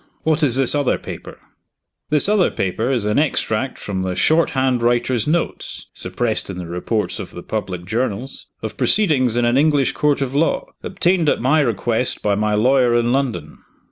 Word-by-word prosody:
What 160 0 +1
is 135 -6 +3
this 135 -2 +4
other 145 -3 +1
paper?" - - -9 0.7
"This 150 +3 +4
other 205 -3 +3
paper 110 +7 -2
is 120 -6 0
an 105 +5 +1
extract 130 -4 -1
from 95 -2 -4
the 95 -1 -2
short 160 - +2
hand 130 -2 +1
writer's 120 0 +1
notes 165 +2 -2
(suppressed 110 +5 -3
in 95 - -6
the 90 - -6
reports 90 +4 -3
of - - -6
the 90 - -10
public 95 -5 -4
journals) 115 +4 -3 0.2
of - - -5
proceedings 135 - +2
in 120 - +2
an 120 +2 +2
English 145 -3 +2
court 150 -1 +1
of 135 -1 -2
law, 150 +4 +1 0.2
obtained 180 -4 +1
at - - +1
my 130 +6 +2
request 120 -1 -1
by 105 - +2
my 105 +1 0
lawyer 125 +2 +3
in 120 +1 +1
London." 115 - -2
125 Hz, 180 wpm, -19 LUFS, 105-145 Hz, 0.7 s, this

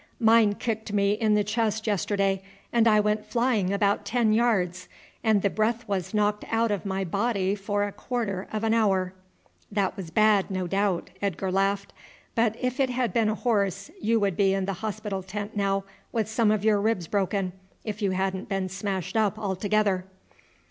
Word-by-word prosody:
"Mine 220 -3 +5
kicked 220 -2 -3
me 200 -1 +2
in 215 0 +2
the 210 - +3
chest 220 0 -1
yesterday 195 -1 0 0.3
and 235 -1 +4
I 215 -1 +5
went 210 0 +1
flying 235 -6 +1
about 200 +1 +1
ten 220 0 +2
yards, 185 -6 +1 0.3
and 220 -4 +3
the 200 - +3
breath 230 +2 0
was 190 -2 -2
knocked 210 -1 +1
out 225 0 +1
of 200 -1 -2
my 190 0 -1
body 200 +1 0
for 205 0 -1
a 205 - -2
quarter 200 -5 -3
of 215 0 -3
an 225 0 +2
hour." 190 -5 +2 0.6
"That 200 -2 0
was 185 -4 -7
bad, 210 +2 +3
no 185 -1 -2
doubt," 195 0 0
Edgar 190 -1 -1
laughed; 195 +1 0 0.4
"but 225 -2 +2
if 255 +1 -2
it 265 -1 +3
had 245 -5 -1
been 225 -2 +2
a 215 - 0
horse 200 -5 0
you 225 +1 +2
would 200 -4 +1
be 195 0 +3
in 195 -1 -1
the 195 - -2
hospital 210 -2 -3
tent 205 +3 -6
now 195 -1 +1 0.3
with 220 -3 0
some 220 0 +2
of 215 -1 +1
your 210 -2 +4
ribs 215 -5 0
broken, 195 0 -1 0.3
if 215 -1 -5
you 200 - +2
hadn't 190 +1 -2
been 195 -2 -1
smashed 195 +1 -3
up 215 -1 +2
altogether." 200 -1 0
205 Hz, 185 wpm, -26 LUFS, 195-220 Hz, 0.6 s, Mine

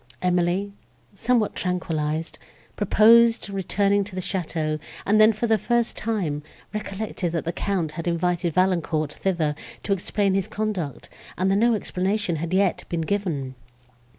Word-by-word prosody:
Emily, 180 +3 0 0.4
somewhat 225 +1 +1
tranquillized, 160 -3 -2 0.4
proposed 225 +1 +5
returning 200 +1 +1
to 195 -2 -9
the - - -2
château, 160 -4 -2 0.3
and 215 +2 +4
then, 215 +1 +7
for 220 +2 -2
the 220 -2 +3
first 240 -1 +1
time, 185 -10 -2 0.3
recollected 205 -4 -3
that 165 - -2
the 170 - -2
Count 185 -6 -1
had 165 +2 -6
invited 175 0 0
Valancourt 170 -5 +1
thither 170 -6 0 0.3
to 200 - +1
explain 195 +1 0
his 195 -1 0
conduct, 195 - -3 0.3
and 190 +2 +2
that - - +3
no 235 +2 +4
explanation 195 -2 -1
had 165 +2 -4
yet 190 0 +2
been 170 -1 -1
given. 160 -8 -2
185 Hz, 145 wpm, -24 LUFS, 170-205 Hz, 0.4 s, then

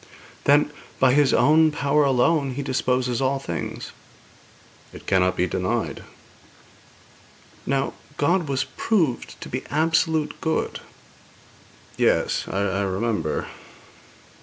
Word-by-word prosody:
'Then, 145 +1 +4 0.3
by 130 -1 +4
His 145 -1 +4
own 155 +2 +5
power 150 0 +2
alone 135 +1 +2
He 140 - -3
disposes 125 -2 0
all 135 +1 +1
things.' 85 - -5 1.0
'It - - -12
cannot 95 -1 +2
be 90 - +2
denied.' 90 0 -2 1.7
'Now, 135 0 0 0.2
God 170 +3 +1
was 135 -2 0
proved 130 - -1
to - - -7
be 125 - -4
absolute 160 0 +1
good.' 160 0 -1 1.2
'Yes; - - +1
I 95 0 -1
remember.' 95 -4 -1
135 Hz, 105 wpm, -23 LUFS, 100-150 Hz, 1.7 s, own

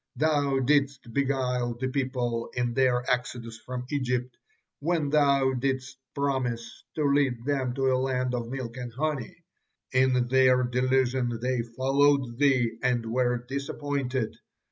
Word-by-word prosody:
Thou 145 -3 +2
didst 135 -3 +1
beguile 125 -3 0
the 130 - -1
people 125 -3 -2
in 120 -1 0
their 125 -1 +2
exodus 120 -2 -2
from 125 +1 -6
Egypt, 125 -3 -1 0.4
when 160 -1 0
thou 140 -3 +3
didst 130 +1 -2 0.2
promise 130 -5 -2
to 150 - 0
lead 140 -4 +2
them 135 -3 -1
to 135 - -2
a 130 - +3
land 130 -1 0
of 120 -1 -3
milk 130 -2 -5
and 125 -1 -5
honey; 150 +3 -3 0.5
in 130 -1 +3
their 130 0 +4
delusion 125 -1 +1
they 125 0 0
followed 130 +1 +1
thee 125 -5 +2
and 125 -2 +1
were 125 0 0
disappointed. 140 -3 -3
130 Hz, 135 wpm, -27 LUFS, 125-140 Hz, 0.5 s, their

